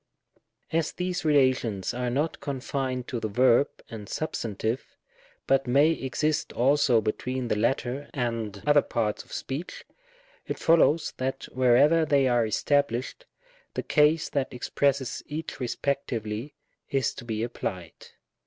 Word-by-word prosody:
As 160 -1 0
these 180 +1 -2
relations 130 - +2
are 125 0 -2
not 145 +6 -1
confined 130 -2 -3
to 120 - -2
the 110 - -2
verb 125 +5 +4 0.2
and 105 -3 -9
substantive, 115 -5 -3 0.5
but 135 -1 +2
may 140 +6 +5
exist 150 +1 -1
also 130 -2 +3
between 125 +3 -2
the - - +2
latter 125 +5 -1
and 115 -6 -3
other 145 0 +5
parts 110 -3 -2
of - - -21
speech, 140 +7 -5 0.6
it - - -3
follows 165 -1 +3
that 130 +1 -3
wherever 130 +6 +5
they 140 -3 +3
are 120 -2 +2
established, 140 - 0 0.5
the - - -2
case 155 +1 +3
that 140 -2 -1
expresses 135 +1 0
each 155 +2 -5
respect 140 +2 -2
ively 110 +4 -4 0.4
is 135 -1 0
to - - -9
be 110 -2 -3
applied. 90 -7 -5
130 Hz, 135 wpm, -27 LUFS, 120-145 Hz, 0.6 s, may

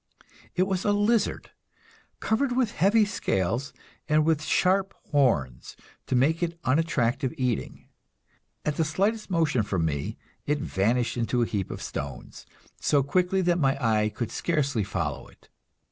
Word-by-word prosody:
It 185 - +3
was 190 -1 -1
a 205 - +2
lizard, 205 +1 +1 0.7
covered 245 +4 0
with 245 -5 +2
heavy 210 +6 +3
scales, 115 - -1 0.4
and 155 0 +4
with 160 -2 +2
sharp 190 +4 +1 0.2
horns 75 - +1 0.3
to - - 0
make 150 +7 +2
it 170 -1 -2
unattractive 135 -3 +1
eating. 125 -4 -2 0.8
At 150 -1 -1
the 165 - +3
slightest 200 +9 0
motion 160 -9 +2
from 95 -5 -1
me 70 -3 -3 0.3
it 150 +1 +2
vanished 120 0 0
into 120 +1 +1
a - - +2
heap 100 -4 -3
of - - -6
stones, - - -7 0.3
so 145 -2 +2
quickly 180 +6 +1
that 175 0 +2
my 135 -3 +2
eye 110 -4 +2
could 110 +1 -4
scarcely 140 -9 0
follow 100 - -3
it. - - -22
145 Hz, 145 wpm, -26 LUFS, 120-180 Hz, 0.8 s, and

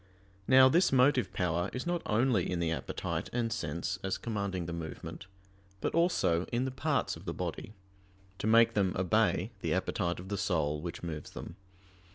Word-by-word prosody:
Now 130 0 +8
this 175 +7 +4
motive 130 -4 +4
power 90 0 0
is 125 - -4
not 175 -1 -1
only 110 -3 +2
in 90 - -1
the 85 -1 0
appetite 80 - -3
and 115 -2 -1
sense 85 -2 -3
as 95 -1 -1
commanding 100 -6 -3
the 85 - -5
movement, 85 +2 -7 0.5
but - - -2
also 130 - +2
in 120 +2 -1
the 130 - -2
parts 135 -1 0
of - - -12
the - - -4
body, 105 - -5 0.7
to - - -2
make 115 +1 +6
them 95 -3 +1
obey 90 -2 +2
the - - 0
appetite 85 0 -1
of 95 +1 -9
the 100 - -2
soul 75 -4 0
which 85 +1 -6
moves 80 -4 -5
them. - - -8
100 Hz, 180 wpm, -31 LUFS, 85-125 Hz, 0.7 s, Now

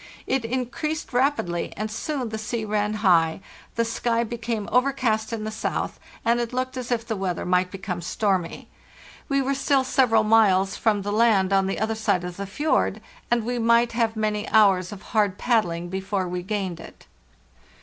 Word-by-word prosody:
It 265 -2 0
increased 260 +6 -3
rapidly, 245 -10 0
and 215 +1 -3
soon 260 +1 -3
the 220 0 -4
sea 220 +1 -3
ran 210 0 0
high, 165 -3 +4 0.4
the 230 - +1
sky 230 0 0
became 230 -2 -4
overcast 250 -4 +1
in 225 -2 -3
the 215 - -3
south, 220 - -3 0.3
and 235 +1 +3
it 240 0 -2
looked 255 +1 -2
as 255 -1 -5
if 230 -1 0
the 225 -1 -2
weather 190 -3 -2
might 180 0 +2
become 185 -2 -5
stormy. 185 -1 -1 0.6
We 275 -1 +2
were 275 +1 0
still 275 0 +2
several 245 -4 +3
miles 200 -3 +4
from 210 -3 +1
the 205 - -2
land 210 -4 +3
on 195 -1 +3
the 195 - -2
other 220 +1 0
side 205 -5 0
of 180 0 -6
the 200 0 -5
fjord, 295 +11 0 0.3
and 235 -1 +2
we 245 0 -2
might 235 +1 +3
have 230 -1 0
many 215 0 -1
hours 195 -4 +4
of 205 -1 -9
hard 205 -3 +2
paddling 175 -8 0
before 190 0 -2
we 180 0 -3
gained 190 -3 -3
it. - - -13
220 Hz, 180 wpm, -24 LUFS, 195-235 Hz, 0.6 s, high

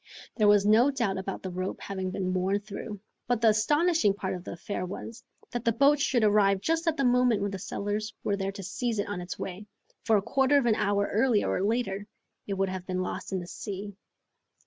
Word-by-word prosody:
There 215 -3 +3
was 205 -1 +5
no 225 +6 +5
doubt 230 -9 -1
about 190 0 -5
the 190 - -4
rope 185 +1 -4
having 190 -1 -4
been 185 -1 -2
worn 190 +2 0
through, 205 0 -7 0.3
but 245 -1 +1
the 225 -1 +5
astonishing 295 - +3
part 190 -2 -3
of 180 -1 -6
the - - -6
affair 180 +2 -4
was, 225 +6 -7 0.3
that 240 -1 -3
the 230 - +3
boat 280 +5 +4
should 250 -4 +2
arrive 205 -2 +4
just 325 - -1
at 320 - +2
the 275 - +1
moment 245 -4 +3
when 200 - -1
the 195 - -5
settlers 205 +3 -3
were 205 - +1
there 195 0 -2
to 195 -1 -8
seize 225 +5 -2
it 205 - -1
on 205 -3 -4
its 175 +1 -6
way, 195 +3 -6 0.4
for 225 -2 +4
a - - +1
quarter 270 +5 +3
of 275 - +2
an 235 - +4
hour 200 -1 +1
earlier 225 0 +3
or - - 0
later 205 -1 -1 0.4
it 200 - -2
would 195 0 0
have 185 -1 -6
been 185 0 -1
lost 185 - -5
in 190 - -1
the - - -7
sea. 200 +2 -6
205 Hz, 230 wpm, -28 LUFS, 195-235 Hz, 0.4 s, was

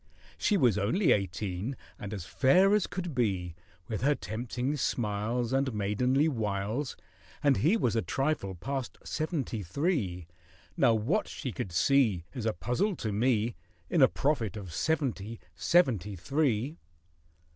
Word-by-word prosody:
She 210 - +2
was 120 - +3
only 140 - +2
eighteen, 100 +4 -1 0.2
and 100 - -6
as 100 -6 -5
fair 185 - +4
as 210 -3 +3
could 175 -3 -4
be, 95 -8 0 0.3
With 110 -3 -3
her 145 +3 +3
tempting 125 +5 -3
smiles 115 0 -1
And 135 0 +2
maidenly 125 +8 +2
wiles, 110 +1 -2 0.5
And 140 -3 +4
he 175 - +3
was 120 - +1
a 115 - +2
trifle 135 -10 -1
past 135 +7 -4
seventy 155 - -2
three: 100 - -1 0.5
Now 120 -4 +4
what 130 - 0
she 130 - -5
could 95 -1 -5
see 110 -2 +3
Is 120 -5 -3
a 110 - +1
puzzle 180 - 0
to 110 - -3
me, 115 +1 +1 0.4
In - - +3
a - - +9
prophet 120 -8 -1
of 95 -5 -7
seventy—seventy 115 - 0
three! 135 - 0
120 Hz, 140 wpm, -30 LUFS, 105-140 Hz, 0.5 s, a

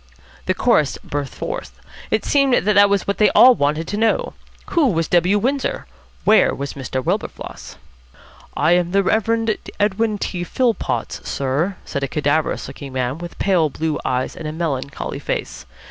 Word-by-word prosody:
The - - +1
chorus - - +2
burst 145 -2 -4
forth. - - -6 0.3
It - - 0
seemed 275 -3 +3
that 210 - +3
that 200 0 +6
was 200 -1 +1
what 200 - -2
they 210 - +6
all 255 +1 +9
wanted 150 -3 0
to 205 - -2
know: 220 0 +1 0.4
Who 330 -5 +3
was 165 -7 0
W. 180 +3 +3
Windsor? 265 +6 -1 0.4
Where 215 +1 +4
was 140 0 -5
Mr. 130 -1 -4
Wilberfloss? - - -4 0.8
"I 155 +3 +3
am 175 0 +2
the 200 0 +3
Reverend 225 +2 +1 0.2
Edwin 210 +1 +1
T. 180 -3 -3
Philpotts, 180 - -1
sir," 140 +8 -1
said 140 - -4
a 140 - -1
cadaverous 150 +3 0
looking 140 -2 -9
man 130 +3 -2
with 175 0 -8
pale 180 -6 +2
blue 155 +1 -2
eyes 130 0 -1
and 160 - -6
a - - -3
melancholy 140 -4 -3
face. - - -4
175 Hz, 165 wpm, -20 LUFS, 145-210 Hz, 0.8 s, all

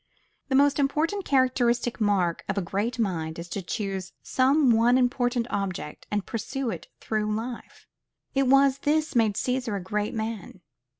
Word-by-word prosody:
The 265 - +1
most 285 +1 +4 0.5
characteristic 245 -3 +1
mark 190 -5 +1
of 195 - -1
a - - +2
great 205 +7 -2
mind 165 -8 -2
is 170 +1 -6
to 200 - -3
choose 190 -1 -4
some 265 +1 +3
one 235 +2 +4
important 245 -1 +1
object, 190 -6 -4
and 205 -2 -1
pursue 250 +2 -3
it - - -7
through 215 -1 -1
life. 235 +2 -7 0.5
It 275 -1 +2
was 275 +1 +5
this 305 +1 0
made 220 -3 +3
Cæsar 250 -3 -1
a - - -3
great 205 +4 -2
man. 220 -4 -5
230 Hz, 155 wpm, -26 LUFS, 200-260 Hz, 0.5 s, was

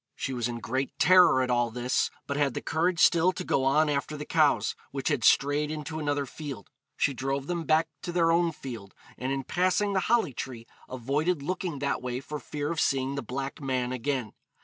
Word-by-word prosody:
She 135 - -3
was 120 -2 -1
in 120 -1 -4
great 130 +4 -3
terror 180 -8 +6
at 125 - -1
all 120 -1 +2
this, 125 +2 0 0.2
but 140 - -3
had 140 -3 +1
the - - -3
courage 170 +2 0
still 170 +1 +5
to - - -5
go 135 - +1
on 150 +4 +4
after 145 +1 -2
the 150 - -6
cows, 155 -3 +2 0.2
which 135 +1 -2
had 145 -7 0
strayed 145 +4 +3
into 155 +1 -5
another 145 -2 -1
field. 135 -5 -8 0.3
She 145 - +2
drove 135 +1 -2
them 170 0 -3
back 160 +1 +3
to 175 - -4
their 170 -1 +3
own 170 0 +3
field, 115 -10 -9 0.2
and 130 +1 -3
in 135 0 -2
passing 185 +6 +1
the 190 - +2
holly 225 - +3
tree 120 -2 -6 0.2
avoided 140 +6 -1
looking 180 -1 -3
that 140 0 -1
way 125 0 -3
for 150 +2 -6
fear 145 +1 -4
of 165 - -2
seeing 135 0 +1
the 140 - -3
black 135 +5 -5
man 130 -2 -1
again. 130 -3 -2
140 Hz, 210 wpm, -28 LUFS, 130-160 Hz, 0.3 s, terror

